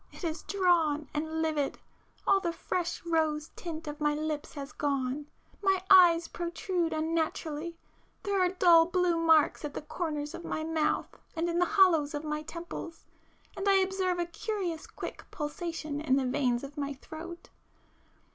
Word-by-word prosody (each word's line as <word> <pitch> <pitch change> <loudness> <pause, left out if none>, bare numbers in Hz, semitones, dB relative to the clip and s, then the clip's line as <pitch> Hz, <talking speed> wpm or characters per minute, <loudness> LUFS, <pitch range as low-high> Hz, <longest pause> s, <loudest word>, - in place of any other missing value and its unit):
It - - -12
is 325 -1 -2
drawn 335 -6 +2
and 315 +2 -1
livid,—all 315 +5 -1
the 345 -3 -1
fresh 345 +1 -3
rose 315 -2 0
tint 325 -2 -6
of 295 +1 -6
my 295 0 +2
lips 305 0 -3
has 280 0 -6
gone,—my 290 +8 -2
eyes 345 -3 +8
protrude 345 0 -2
unnaturally,... 320 0 -2 0.5
there 400 -1 +1
are 365 - +4
dull 345 -3 +6
blue 360 -1 +2
marks 320 -2 +4
at 295 -1 -5
the - - -3
corners 300 -1 -3
of 345 - -7
my 315 - -3
mouth 315 -1 0 0.2
and 330 +1 0
in 340 0 0
the 355 - +4
hollows 325 -6 +5
of 295 - -3
my 300 0 -2
temples, 335 +1 -7 0.5
and 390 +1 0
I 395 - +6
observe 380 -1 +1
a 345 - 0
curious 345 -1 -4
quick - - -7
pulsation 305 -2 -4
in 280 -4 +2
the 270 - +2
[p 255 - -1
421] - - -2
veins 250 -3 +1
of 280 +1 -9
my 280 0 -2
throat. 330 +5 -9
325 Hz, 165 wpm, -30 LUFS, 300-350 Hz, 0.5 s, eyes